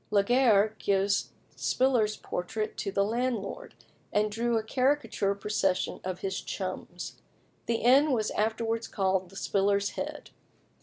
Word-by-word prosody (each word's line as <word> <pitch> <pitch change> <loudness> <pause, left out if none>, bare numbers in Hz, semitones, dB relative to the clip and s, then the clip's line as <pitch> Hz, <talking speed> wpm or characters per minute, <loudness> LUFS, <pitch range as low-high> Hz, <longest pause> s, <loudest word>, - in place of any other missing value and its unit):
Laguerre 215 0 +4
gave 200 0 +2 0.4
Spiller's 245 -5 +2
portrait 215 +5 -4
to 195 - -2
the 200 +1 +2
landlord, 235 - -2 0.4
and 210 0 +1
drew 230 +2 0
a 220 - -1
caricature 250 -5 +1
procession 200 -2 0
of 185 -1 -4
his 190 0 -2
"chums." 185 -2 -6 0.5
The 235 - +1
inn 270 +6 +5
was 220 -4 +1
afterwards 225 +1 -1
called 190 -2 0
the 195 - -16
"Spiller's 200 +1 +1
Head." - - -6
210 Hz, 125 wpm, -29 LUFS, 195-235 Hz, 0.5 s, inn